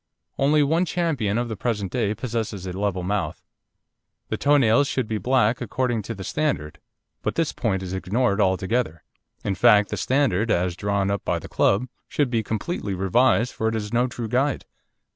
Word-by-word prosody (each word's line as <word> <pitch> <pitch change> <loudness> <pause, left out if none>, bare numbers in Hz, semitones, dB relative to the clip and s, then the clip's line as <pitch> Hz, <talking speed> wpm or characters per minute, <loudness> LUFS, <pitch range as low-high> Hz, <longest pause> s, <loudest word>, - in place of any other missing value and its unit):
Only 145 +2 +4
one 165 +5 +2
champion 145 - 0
of 120 0 0
the 110 - -4
present 105 -5 -2
day 110 -4 0
possesses 110 -6 -3
a 90 - -4
level 95 -1 -1
mouth. 100 +1 -2 0.9
The - - -1
toe 145 +1 +4
nails 135 +2 +4
should 130 -4 -1
be 110 -1 -2
black 120 +1 +2
according 120 0 -1
to 115 +3 -6
the 95 - -7
standard, 140 - -2 0.4
but - - -2
this 165 -2 0
point 95 -6 -1
is 95 0 -5
ignored 100 +3 0
altogether. 95 -2 0 0.4
In 100 - 0
fact, 105 -1 +5
the - - -3
standard, 115 -6 +1
as 90 -3 +1
drawn 100 0 0
up 100 - -2
by - - 0
the - - -8
Club, 105 +6 +2 0.2
should 145 -4 0
be 115 -2 +1
completely 110 - -3
revised, 115 +6 +2
for 110 - -1
it 110 - 0
is 105 0 -4
no 120 +2 +3
true 120 -2 -5
guide. 130 +5 0
110 Hz, 185 wpm, -24 LUFS, 100-125 Hz, 0.9 s, fact